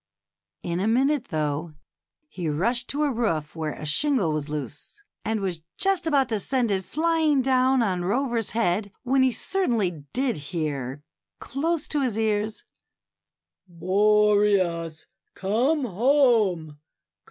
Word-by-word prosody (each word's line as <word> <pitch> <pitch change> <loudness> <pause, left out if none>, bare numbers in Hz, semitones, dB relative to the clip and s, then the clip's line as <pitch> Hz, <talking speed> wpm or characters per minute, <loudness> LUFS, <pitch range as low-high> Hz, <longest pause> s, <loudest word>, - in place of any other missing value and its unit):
In 170 0 -2
a 195 - 0
minute, 265 +3 +2
though, 155 -1 -2 0.5
he 175 - -4
rushed 230 +12 0
to 295 +2 -1
a 290 - +1
roof 165 - -1
where 155 -2 -3
a - - -8
shingle 210 - +2
was 150 -1 -3
loose, 145 - -6 0.2
and 220 -1 -1
was 180 -4 -3 0.2
just 385 -3 +1
about 280 -4 +3
to 220 -2 -1
send 245 0 0
it 190 -1 0
flying 315 -3 +1
down 260 -1 +3
on 185 -4 -1
Rover's 235 +3 0
head, 205 -2 0
when 260 +1 +2
he 260 -1 +4
certainly 220 - -1
did 255 -5 0
hear 145 -5 -3 0.3
close 315 +4 -2
to 295 - 0
his 245 -5 -1
ears, 215 0 -1 0.7
" - - -61
Boreas, 200 -4 +2 0.3
come 250 +10 +1
home 215 - +2
215 Hz, 135 wpm, -25 LUFS, 170-260 Hz, 0.7 s, he